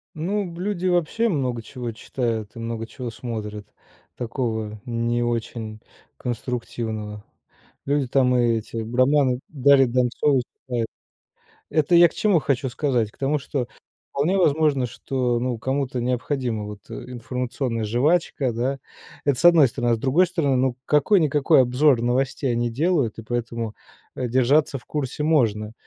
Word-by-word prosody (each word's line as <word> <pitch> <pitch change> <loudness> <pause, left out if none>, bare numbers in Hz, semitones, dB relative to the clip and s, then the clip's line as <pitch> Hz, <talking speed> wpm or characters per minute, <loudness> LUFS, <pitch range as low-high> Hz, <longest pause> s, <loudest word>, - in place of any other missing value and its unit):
Ну, 195 +7 -1
б 170 0 -10
люди 185 -2 -1
вообще 180 +6 +1
много 130 - -1
чего 120 +1 -6
читают 115 -1 -3
и - - -8
много 115 -1 -4
чего 125 -1 -6
смотрят 110 -2 -6 0.5
такого 110 -3 -3
не 120 0 0
очень 115 -2 -3 0.4
конструктивного. 115 - -4 0.6
Люди 140 -1 +1
там 125 0 +3
и 120 -2 +3
эти 110 +1 -7
романы 130 +3 +2
Дарьи 140 -2 +5
Донцовой 125 +2 +2 0.2
читают. 120 -3 -1 0.8
Это 155 +2 +2
я 170 0 +8
к - - -18
чему 205 -6 +3
хочу 135 -2 -1
сказать? 125 -4 0
К - - -26
тому, 140 +2 0
что 135 -2 -3 0.4
вполне 160 +8 +1
возможно, 150 -6 +3
что, 120 0 -1
ну, 125 -1 -1
кому-то 130 0 -1
необходима 125 -2 -1
вот, 105 -1 -8
э, - - -5 0.2
информационная 125 0 -3
жвачка, 135 +3 +1
да? 130 +4 -1 0.5
Это 140 -3 +2
с - - 0
одной 170 -5 +8
стороны. 120 -1 -1
А - - +3
с - - -8
другой 145 +9 +3
стороны, 165 -7 0
ну, 130 -1 +1
какой-никакой 150 -3 +4
обзор 130 +1 +3
новостей 130 +2 0
они 120 0 0
делают, 145 -1 0
и - - -8
поэтому, 115 -1 -3 0.4
э, 125 - -2
держаться 130 +4 +3
в - - -24
курсе 150 0 -3
можно, 110 -9 +1
125 Hz, 150 wpm, -23 LUFS, 115-145 Hz, 0.8 s, я